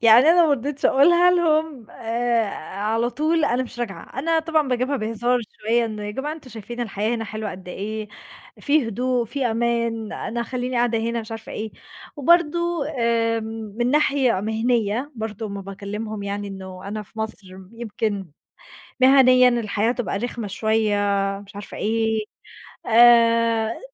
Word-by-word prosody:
يعني 225 0 +8
أنا 345 +1 +6
ما - - +1
رضيتش 285 +2 -3
أقولها 345 +6 +5
لهم 315 -8 +1
آآ، 235 0 0 0.4
على 225 +3 +1
طول 310 +5 +1
أنا 255 -2 +1
مش 240 -1 -10
راجعة، 235 +3 -6
أنا 325 +3 +1
طبعًا 315 -3 +1
باجيبها 255 +3 0
بهزار 235 +2 0 0.2
شوية 230 +2 +2
"إن 215 -2 -5
يا 210 0 -4
جماعة 270 +7 -4
أنتم 305 -5 -11
شايفين 235 +2 -8
الحياة 215 0 -1
هنا 225 -1 -3
حلوة 215 -1 -5
قد 185 0 -10
إيه، 215 +3 -5 0.5
في 285 -4 +2
هدوء، 245 +2 0
في 260 +4 -3
أمان، 230 -1 -1
أنا 235 +1 -4
هخلّيني 250 +1 -3
قاعدة 235 -1 +2
هنا،" 230 +1 -1
مش 220 0 -10
عارفة 225 -1 -7
إيه. 220 0 -5 0.4
وبرضه 340 +1 +2
آمم، 225 -2 -1
من 240 +1 +1
ناحية 275 -7 +2
مهنية 225 +4 0
برضه 220 -1 -5
أمّا 200 -1 -6
باكلِّمهم 205 +2 -6
يعني 200 0 -4
إنه 190 -1 -8
أنا 215 +1 -4
في 220 +2 -17
مصر 220 -2 -5 0.3
يمكن 215 -4 -3 0.7
مهنيًا 255 -1 +7
الحياة 225 -2 0
هتبقى 245 -5 -2
رخمة 235 -2 -4
شوية 220 0 +1 0.5
مش 200 - -16
عارفة 205 0 -8
إيه، 220 0 0 0.6
آآ، 230 -1 +5
230 Hz, 155 wpm, -22 LUFS, 215-255 Hz, 0.7 s, يعني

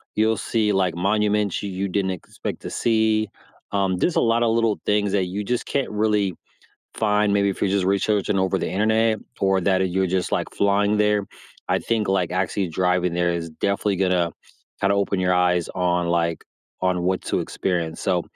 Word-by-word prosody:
you'll 110 +1 +2
see, 105 +2 0
like, 95 -3 +1
monuments 105 +1 +1
you 100 - -3
you 95 +1 -2
didn't 95 0 0
expect 90 - -6
to - - -5
see, 110 -2 +1 0.4
um, 95 -2 0
just 175 - +1
a - - +4
lotta 115 0 +2
little 115 -1 +1
things 105 -1 +2
that 95 -2 +2
you 95 +3 -4
just 120 +3 -2
can't 140 -2 -1
really 105 -2 +1 0.6
find 105 -1 +2
maybe 100 0 +2
if 95 - -6
you're 100 - +2
just 100 -1 +1
researching 100 +1 +1
over 95 -1 +1
the - - -2
internet 110 +4 +2 0.2
or 95 -1 +2
that 95 0 +2
i - - +2
you're 95 +1 0
just, 95 0 -1
like, - - -1
flying 100 +1 +2
there. 105 -1 +2 0.4
I - - +2
think, 110 -3 -1
like, 95 -3 +1
actually 95 +1 0
driving 90 +1 0
there 85 0 +1
is 85 -1 -3
definitely 100 +4 -1
gonna 90 -2 +1 0.5
kinda 100 +1 +2
open 100 -1 0
your 90 0 +2
eyes 90 -1 +2
on, 90 -1 0
like 85 -1 0 0.4
on 90 -1 +1
what 95 +1 0
to - - -1
experience, 85 -4 -2
so 90 -2 +1
95 Hz, 190 wpm, -23 LUFS, 90-105 Hz, 0.6 s, a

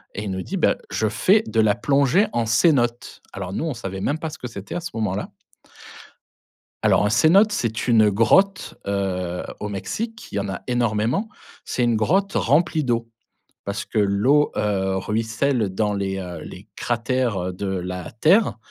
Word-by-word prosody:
et 105 - -4
il 100 - -4
nous 95 - -3
dit: - - -4
«Bah, - - +2
je 110 - 0
fais 205 - +3
de 115 - -1
la 105 -2 +3
plongée 140 - +3
en 120 -1 0
cénotes». 120 0 +1
Alors 95 -1 -5
nous, 155 - -2
on - - -1
ne - - -2
savait 95 -4 -6
même 145 - 0
pas 160 -1 -5
ce 155 - -10
que 125 - -5
c'était 100 -4 -8
à - - -1
ce 175 - -5
moment-là. 105 -2 -2 1.6
Alors - - +4
un - - +2
cénote, 190 - +5
c'est 115 - -2
une 110 -3 +5
grotte, 185 - +2
heu, 90 -3 -2 0.2
au 105 - -3
Mexique. 225 - -5
Il - - -6
y - - +1
en 100 - -4
a 95 - -5
énormément, 120 - 0 0.3
c'est 125 - -3
une 120 -1 +2
grotte 190 - +1
remplie 155 +4 +2
d'eau, 115 -2 -1 0.6
parce 100 +2 -3
que 110 - -3
l'eau, 105 +9 +3
heu, 95 -2 0
ruisselle 110 +3 0
dans 105 +1 0
les, 95 -1 -2
heu, 90 -3 -6
les 95 +3 -10
cratères, 120 -1 -1
heu, - - -4
de 95 +3 -5
la 90 -2 -4
terre 160 - +3
110 Hz, 185 wpm, -22 LUFS, 100-140 Hz, 1.6 s, cénote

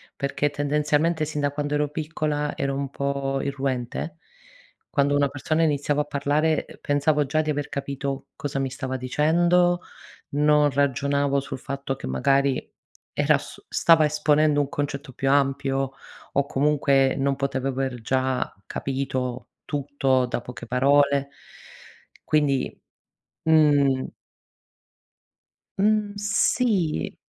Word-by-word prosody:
perché 140 +1 -1
tendenzialmente, 150 +2 +1
sin 150 -1 -3
da 145 0 +1
quando 145 0 -3
ero 150 0 +1
piccola 150 -1 -2
ero 140 0 -1
un 140 0 -3
po' 140 0 -2
irruente. 135 +3 -3 0.7
Quando 145 0 +2
una 145 0 +3
persona 155 +4 -1
iniziava 145 -1 +1
a - - -17
parlare, 145 +2 0
uhm, - - -11
pensavo 145 +1 +1
già 155 +3 +1
di 155 - -4
aver 145 -1 -1
capito 140 0 -4
cosa 145 -1 -3
mi 135 -1 -1
stava 130 0 -4
dicendo, 175 +7 +2 0.5
non 150 0 +3
ragionavo 140 0 +1
sul 135 - -7
fatto 135 0 -4
che - - -7
magari 135 - +1 0.5
era - - +3
su - - -11
stava 165 -2 +4
esponendo 150 0 +3
un 140 - -2
concetto 145 -1 -4
più 135 +2 -1
ampio 135 -1 +1 0.4
o 140 - +1
comunque 140 -1 +2
non 135 0 +1
potev 135 -1 -2
aver 135 -1 -1
già 130 +2 -1
capito 130 -2 -3 0.2
tutto 135 -3 0
da 120 - -3
poche 120 -1 -9
parole 140 +2 +3 1.0
quindi, 145 -3 +1 0.7
mhmm 145 -4 +4 1.7
Mh, 210 0 +2
sì 205 -4 +1
140 Hz, 125 wpm, -24 LUFS, 135-150 Hz, 1.7 s, stava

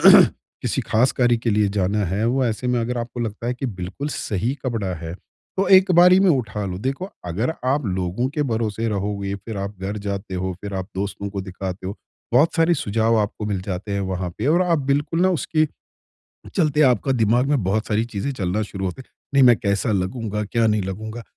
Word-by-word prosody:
किसी - - +5
ख़ास 120 +4 +2
कार्य 120 -2 +3
के 115 0 -1
लिए 105 -1 +3
जाना 100 +2 +1
है, 95 +5 -1
वो 130 +2 +2
ऐसे 115 +1 -2
में 125 0 +2
अगर 120 +1 -2
आपको 120 +1 -5
लगता 115 0 -4
है 125 - 0
कि 130 +2 -4
बिल्कुल 100 +6 -5
सही 110 -2 -2
कपड़ा 110 -7 -1
है। 80 0 -6 0.4
तो 195 - +2
एक 185 0 +4
बारी 180 +2 +7
में 195 - +5
उठा 110 -7 -1
लो। 90 -1 -4
देखो 135 - -3 0.2
अगर 105 - -1
आप 135 +2 +1
लोगों 95 +6 -1
के 150 +2 -1
भरोसे 115 -3 -1
रहोगे, 100 -1 -2
फ़िर 105 +2 -7
आप 100 0 -5
घर 100 +2 -3
जाते 100 -1 -4
हो, 95 +1 -2
फ़िर 100 -1 -6
आप 95 0 -4
दोस्तों 100 +1 -3
को 100 0 -4
दिखाते 95 0 -6
हो। 100 - -5 0.4
बहुत 145 +7 +4
सारे 165 0 +4
सुझाव 115 -2 +1
आपको 105 0 -2
मिल 100 -3 -1
जाते 95 +1 -4
हैं 100 - 0
वहाँ 95 -2 -2
पे 115 - -1
और 170 +4 +4
आप 170 -3 +2
बिल्कुल 145 +4 +1
ना 185 - +4
उसके 155 -2 +1 0.9
चलते 155 -4 +2
आपका 125 +3 +1
दिमाग 120 +1 +3
में 140 -7 +2
बहुत 105 +4 0
सारी 110 +1 +1
चीज़ें 115 +3 -3
चलना 100 -1 -1
शुरू 95 -2 -5
होते 95 +8 -4
हैं। - - -19 0.2
नहीं 135 - +6
मैं 120 -2 +7
कैसा 100 +2 0
लगूँगा, 105 +2 -1
क्या 115 +2 +1
नहीं 105 -1 +2
लगूँगा। 110 +5 -5
110 Hz, 210 wpm, -22 LUFS, 100-130 Hz, 0.9 s, बारी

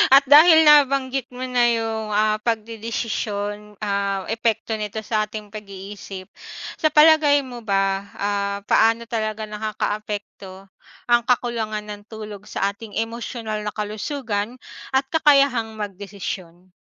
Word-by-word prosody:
At 275 - +7
dahil 315 +4 +8
nabanggit 275 -3 +4
mo 255 - -5
na 250 -1 +2
yung 225 -1 -2
ah 215 +1 +2
pagdedesisyon, 215 -2 -3
ah, 200 -1 -1
epekto 225 -1 -1
nito 210 +1 -4
sa 215 -1 0
ating 210 -1 -8
pag-iisip 200 -2 -9 0.5
sa 315 - +4
palagay 300 -1 +5
mo 250 -2 -8
ba, 195 -2 0
ah, 200 0 -1
paano 225 +3 +3
talaga 215 -1 -2
nakakaapekto 210 -2 -5 0.4
ang 240 0 +6
kakulangan 230 -3 0
ng 210 -1 -8
tulog 210 -2 -9
sa 195 - -1
ating 205 +1 -12
emosyonal 225 -1 -3
na 210 -1 -4
kalusugan 215 +1 -3 0.4
at 265 - +4
kakayahang 275 -8 +3
magdesisyon? 190 -3 -7
215 Hz, 120 wpm, -22 LUFS, 205-240 Hz, 0.5 s, dahil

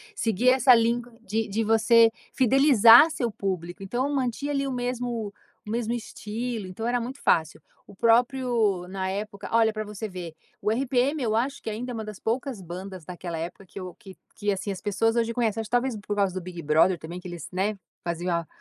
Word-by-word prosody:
seguir 230 +2 +2
essa 255 0 +6
linha 235 +1 +3 0.2
de 225 0 -2
de 220 +3 0
você 225 +1 +5 0.2
fidelizar 260 0 +7
seu 240 -6 -1
público, 185 -2 -4
então 245 +8 -1
mantinha 270 +1 -1
ali 275 -1 0
o - - -2
mesmo, 245 -4 -3 0.3
o - - -9
mesmo 235 0 -1
estilo, 225 -1 -5
então 185 +5 -6
era 245 +1 +1
muito 255 +4 -7
fácil, 160 0 +1 0.3
o - - -13
próprio, 230 -4 +2
na 190 0 -3
época 200 +1 -5
olha, 225 -1 +4
pra 215 - -3
você 210 +1 -6
ver, 180 -3 -7 0.3
o - - 0
RPM, 265 +4 +1
eu 220 -2 0
acho 260 +5 -1
que - - -4
ainda 235 +4 -4
é - - -5
uma 225 -2 -4
das 210 -2 -8
poucas 240 -1 -2
bandas 185 +1 -8
daquela 175 -1 -6
época 175 +4 -6
que 195 - -10
eu 185 -1 -7
que 195 -5 -13 0.2
que 205 -1 -1
assim 200 +1 -3
as 190 - -6
pessoas 225 +2 +1
hoje 230 -1 +1
conhecem. 225 -2 0
Acho 220 - -7
que - - -27
talvez 245 0 +1
por 205 0 -4
causa 200 -3 +1
do 185 - -4
Big 175 -1 -8
Brother 160 +5 +4
também, 170 +3 -8
que 180 - -9
eles, 170 -3 -7
né, 195 +3 -1 0.3
faziam 175 +1 -2
a 170 -1 -3
220 Hz, 210 wpm, -26 LUFS, 190-240 Hz, 0.3 s, fidelizar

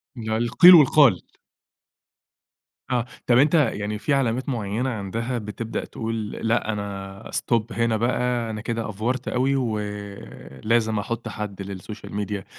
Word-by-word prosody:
لأ، 110 -2 -2
القيل 125 +10 +8
والقال. 140 - +6 1.7
آه، 120 -1 +1 0.2
طَب، 120 -1 +5
أنت 145 +5 +4
يعني 105 -7 +1
في 150 - 0
علامات 130 0 0
معيَّنة 115 +1 -2
عندها 115 +3 -3
بتبدأ 110 +1 -5
تقول 110 -2 -4
"لأ، 115 -1 -1
أنا 100 -1 -6
stop 115 -2 +1
هنا 115 0 +1
بقى، 120 0 0
أنا 110 -1 -5
كده 115 -1 -3
أفورت 120 +5 -3
أوي 135 +2 +1
ولازم 105 - -2
أحُط 115 +3 -4
حد 105 -2 -6
للسوشيال 100 +3 -8
ميديا" 100 -2 -3
115 Hz, 130 wpm, -24 LUFS, 105-120 Hz, 1.7 s, القيل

